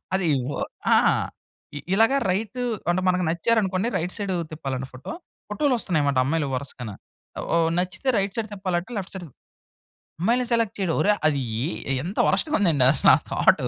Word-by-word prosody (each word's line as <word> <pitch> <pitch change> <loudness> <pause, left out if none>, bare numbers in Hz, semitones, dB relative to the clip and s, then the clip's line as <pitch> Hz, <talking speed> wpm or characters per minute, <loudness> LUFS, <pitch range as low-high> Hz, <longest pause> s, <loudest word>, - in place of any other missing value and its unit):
అది 190 -3 +1 0.2
వా - - -3 0.3
ఆ! - - +8 0.8
ఇ 145 - -4
ఇలాగ 225 +5 +4 0.2
రైట్ 215 +5 -2 0.3
అంటే 180 +2 +1
మనకు 180 0 +2
నచ్చారనుకోండి, 195 +2 +1
రైట్ 175 +2 -3
సైడ్ 200 -3 -2 0.2
తిప్పాలట 135 -4 -4
ఫోటో. 125 - -8 0.4
ఫోటోలు 255 +6 +1
వొస్తున్నాయన్నమాట 145 -9 +1
అమ్మాయిలు 150 +1 0
వరుసగాన. 125 -3 -5 0.6
ఓ - - +4 0.2
నచ్చితే 185 +8 -2
రైట్ 195 0 -1
సైడ్ 225 -1 -2
తిప్పాలంట 185 -1 -2
లెఫ్ట్ 190 -2 -6
సైడ్ 185 -2 -6
తి - - -22 0.9
అమ్మాయిలని 240 +6 +2
సెలెక్ట్ 230 -3 +1
చేయడం, 185 -4 0
ఓరే! 210 - +4 0.2
అది 145 -3 +1 0.5
ఏ - - +2
ఎంత 185 +5 -6
వర్స్ట్‌గా 305 -1 +1
ఉందండి 160 -10 +3
అసలా 140 - +5 0.2
థౌటు - - +3
185 Hz, 160 wpm, -24 LUFS, 155-210 Hz, 0.9 s, ఆ